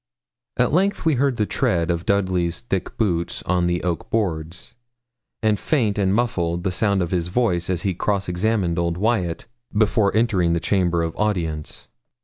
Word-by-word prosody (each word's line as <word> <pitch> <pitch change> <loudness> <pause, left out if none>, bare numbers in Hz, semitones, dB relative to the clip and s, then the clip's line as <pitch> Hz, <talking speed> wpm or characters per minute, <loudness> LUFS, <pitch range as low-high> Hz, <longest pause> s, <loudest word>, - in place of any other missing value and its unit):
At - - +2
length 195 +2 +1
we 160 - +4
heard 135 0 +1
the 105 - +1
tread 85 -3 0
of 85 0 -3
Dudley's 95 -2 +1
thick 95 -6 -3
boots 85 -6 -1
on 90 -1 +1
the 85 0 -1
oak 90 -2 -2
boards, 85 -6 -2 0.7
and 105 -2 +2
faint 110 -9 0
and 95 -1 +2
muffled 90 -7 0
the 95 - 0
sound 95 +1 +1
of 85 - -4
his 90 -2 0
voice 90 -4 0
as 90 -2 -1
he 95 - 0
cross 100 +2 -1
examined 90 -1 0
old 85 0 -1
Wyat 95 -5 0 0.3
before 105 -1 +2
entering 95 -7 +2
the 85 - +1
chamber 85 -3 +1
of 80 -1 -3
audience. 85 -8 -2
95 Hz, 170 wpm, -22 LUFS, 85-105 Hz, 0.7 s, we